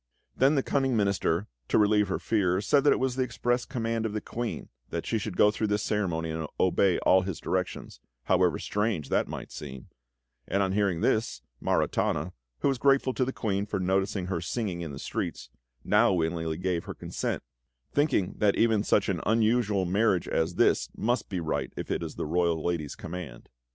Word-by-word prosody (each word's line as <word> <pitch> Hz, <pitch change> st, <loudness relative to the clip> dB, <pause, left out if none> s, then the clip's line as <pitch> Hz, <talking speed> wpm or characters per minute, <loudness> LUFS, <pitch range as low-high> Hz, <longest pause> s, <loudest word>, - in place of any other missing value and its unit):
Then 135 Hz, +4 st, +4 dB
the 135 Hz, -, +2 dB
cunning 135 Hz, -4 st, +1 dB
Minister, 100 Hz, -3 st, +1 dB, 0.2 s
to -, -, +2 dB
relieve 105 Hz, -1 st, +4 dB
her 95 Hz, -, -1 dB
fears, 100 Hz, -2 st, +1 dB
said 140 Hz, +4 st, +4 dB
that -, -, +7 dB
it -, -, 0 dB
was 130 Hz, -1 st, 0 dB
the 130 Hz, -, +1 dB
express 120 Hz, 0 st, -1 dB
command 115 Hz, -3 st, -2 dB
of 110 Hz, -2 st, -2 dB
the 105 Hz, -, -1 dB
Queen 120 Hz, 0 st, -3 dB, 0.2 s
that -, -, -4 dB
she 115 Hz, -, 0 dB
should 105 Hz, -4 st, -5 dB
go 105 Hz, -, +6 dB
through 110 Hz, 0 st, -1 dB
this 105 Hz, 0 st, 0 dB
ceremony 85 Hz, -6 st, -1 dB
and 80 Hz, -1 st, -3 dB
obey 95 Hz, 0 st, +3 dB
all 95 Hz, 0 st, +4 dB
his 95 Hz, -3 st, -4 dB
directions, -, -, -3 dB, 0.2 s
however 90 Hz, +1 st, +3 dB
strange 105 Hz, -9 st, -1 dB
they -, -, +2 dB
might -, -, -7 dB
seem; 65 Hz, -4 st, -8 dB, 0.6 s
and 100 Hz, 0 st, +1 dB
on 95 Hz, -, 0 dB
hearing 100 Hz, -4 st, +1 dB
this, 110 Hz, +1 st, 0 dB, 0.2 s
Maritana, 90 Hz, -, 0 dB, 0.3 s
who -, -, +2 dB
was 135 Hz, -3 st, +1 dB
grateful 135 Hz, -1 st, +3 dB
to 130 Hz, -, +1 dB
the 130 Hz, -, -1 dB
Queen 100 Hz, -5 st, -2 dB
for 100 Hz, -, -2 dB
noticing 95 Hz, +1 st, 0 dB
her 90 Hz, -2 st, -2 dB
singing 95 Hz, -2 st, -3 dB
in 80 Hz, -3 st, -5 dB
the 70 Hz, -, -7 dB
streets, -, -, -4 dB, 0.3 s
now -, -, +4 dB
willingly 80 Hz, -2 st, -1 dB
gave 90 Hz, -1 st, -1 dB
her -, -, -6 dB
consent, -, -, -3 dB, 0.5 s
thinking 140 Hz, -10 st, +1 dB
that 105 Hz, -2 st, +3 dB
even 110 Hz, -3 st, +3 dB
such 100 Hz, -, +2 dB
an 90 Hz, -4 st, -1 dB
unusual 110 Hz, -3 st, +2 dB
marriage 95 Hz, 0 st, +2 dB
as 80 Hz, +2 st, 0 dB
this -, -, +3 dB
must 120 Hz, +1 st, 0 dB
be 95 Hz, -, -2 dB
right 80 Hz, -2 st, -2 dB
if -, -, -4 dB
it -, -, 0 dB
was -, -, -5 dB
the -, -, -3 dB
royal 85 Hz, 0 st, 0 dB
lady's 85 Hz, -4 st, -2 dB
command. 85 Hz, -8 st, -8 dB
100 Hz, 195 wpm, -28 LUFS, 90-115 Hz, 0.6 s, that